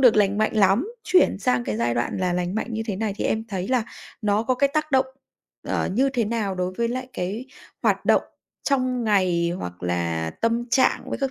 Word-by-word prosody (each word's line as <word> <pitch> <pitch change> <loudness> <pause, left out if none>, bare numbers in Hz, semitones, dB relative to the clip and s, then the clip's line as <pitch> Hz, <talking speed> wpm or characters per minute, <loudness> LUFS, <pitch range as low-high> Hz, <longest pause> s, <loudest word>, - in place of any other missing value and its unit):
được 250 -5 +6
lành 205 -1 +3
mạnh 215 +1 +1
lắm, 205 - +4 0.2
chuyển 365 - +4
sang 125 -10 +1
cái 110 -2 -2
giai 120 +1 0
đoạn 120 0 -1
là 180 -1 0
lành 180 +1 -1
mạnh 220 +2 -3
như 220 - -1
thế 205 - -2
này 215 0 -1
thì - - -3
em 220 +1 0
thấy 190 -2 -3
là 250 -3 +2 0.4
nó 210 0 +2
có 255 +3 +1
cái 280 +2 +3
tác 310 0 0
động, 265 -1 +4 0.6
ờ, - - 0
như 260 +7 +3
thế 245 -4 0
nào 210 -3 -1
đối 180 0 -2
với 235 0 +1
lại 255 +2 -4
cái 200 +8 -4 0.4
hoạt - - +2
động - - +4 0.4
trong 255 -3 0
ngày, 185 -5 +2
hoặc 90 - -7
là 85 -2 -1
tâm 230 +1 0
trạng 260 - +3
với - - -2
các 270 -1 -1
210 Hz, 225 wpm, -24 LUFS, 180-245 Hz, 0.6 s, được